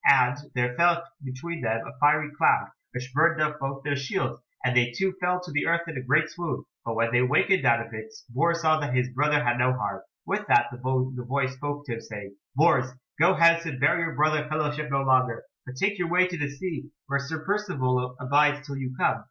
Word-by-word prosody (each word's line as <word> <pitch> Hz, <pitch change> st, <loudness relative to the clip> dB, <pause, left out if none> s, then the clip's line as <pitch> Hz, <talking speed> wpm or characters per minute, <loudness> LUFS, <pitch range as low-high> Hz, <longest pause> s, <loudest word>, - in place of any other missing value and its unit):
And 125 Hz, -3 st, +5 dB, 0.2 s
there 125 Hz, 0 st, 0 dB
fell 170 Hz, 0 st, +4 dB, 0.2 s
between 140 Hz, +6 st, -6 dB
them 115 Hz, -1 st, 0 dB
a -, -, -8 dB
fiery 150 Hz, +1 st, +3 dB
cloud, -, -, +3 dB, 0.2 s
which 125 Hz, +1 st, -6 dB
burned 165 Hz, +3 st, +3 dB
up 150 Hz, -1 st, 0 dB
both 135 Hz, 0 st, -4 dB
their 145 Hz, -1 st, -1 dB
shields, 140 Hz, -3 st, -3 dB, 0.2 s
and 125 Hz, 0 st, +1 dB
they 120 Hz, -1 st, +4 dB
two 190 Hz, -1 st, 0 dB
fell 180 Hz, 0 st, +1 dB
to 180 Hz, -, -9 dB
the 150 Hz, +2 st, 0 dB
earth 170 Hz, 0 st, +1 dB
in 165 Hz, -, -6 dB
a 130 Hz, -, -3 dB
great 145 Hz, +5 st, +2 dB
swoon; 175 Hz, -1 st, -4 dB, 0.2 s
but 115 Hz, -1 st, -3 dB
when 115 Hz, +1 st, +1 dB
they 120 Hz, -, +4 dB
awakened 135 Hz, +6 st, +3 dB
out 115 Hz, 0 st, +3 dB
of 115 Hz, -, -15 dB
it 110 Hz, 0 st, -7 dB, 0.2 s
Bors 170 Hz, +7 st, +1 dB
saw 155 Hz, -1 st, +3 dB
that 145 Hz, -4 st, -2 dB
his 125 Hz, 0 st, +1 dB
brother 150 Hz, +3 st, +2 dB
had 120 Hz, -2 st, +1 dB
no 125 Hz, +1 st, +3 dB
harm. 105 Hz, -6 st, -3 dB, 0.2 s
With -, -, -2 dB
that 120 Hz, 0 st, +4 dB
the 120 Hz, -, -9 dB
voice 130 Hz, +1 st, -1 dB
spoke 145 Hz, +2 st, -5 dB
to 125 Hz, -, -4 dB
him 115 Hz, -, -6 dB
saying, 100 Hz, -2 st, -9 dB, 0.2 s
"Bors, 135 Hz, -4 st, +3 dB, 0.3 s
go 175 Hz, +4 st, +5 dB
hence 170 Hz, 0 st, +5 dB
and 135 Hz, -5 st, -5 dB
bear 155 Hz, +4 st, +3 dB
your 165 Hz, -1 st, -2 dB
brother 155 Hz, 0 st, +1 dB
fellowship 150 Hz, -1 st, -2 dB
no 135 Hz, 0 st, 0 dB
longer; 130 Hz, -3 st, +2 dB, 0.2 s
but 125 Hz, -, -8 dB
take 195 Hz, +8 st, 0 dB
your 175 Hz, -2 st, -1 dB
way 180 Hz, +1 st, +4 dB
to 180 Hz, -1 st, -4 dB
the 145 Hz, -3 st, -2 dB
sea, 150 Hz, 0 st, -6 dB, 0.2 s
where 140 Hz, 0 st, 0 dB
Sir 160 Hz, +3 st, -6 dB
Percivale 130 Hz, -12 st, -1 dB
abides 145 Hz, +3 st, +2 dB
till 140 Hz, -1 st, -6 dB
you 130 Hz, -1 st, -5 dB
come." -, -, +1 dB
140 Hz, 225 wpm, -26 LUFS, 125-160 Hz, 0.3 s, And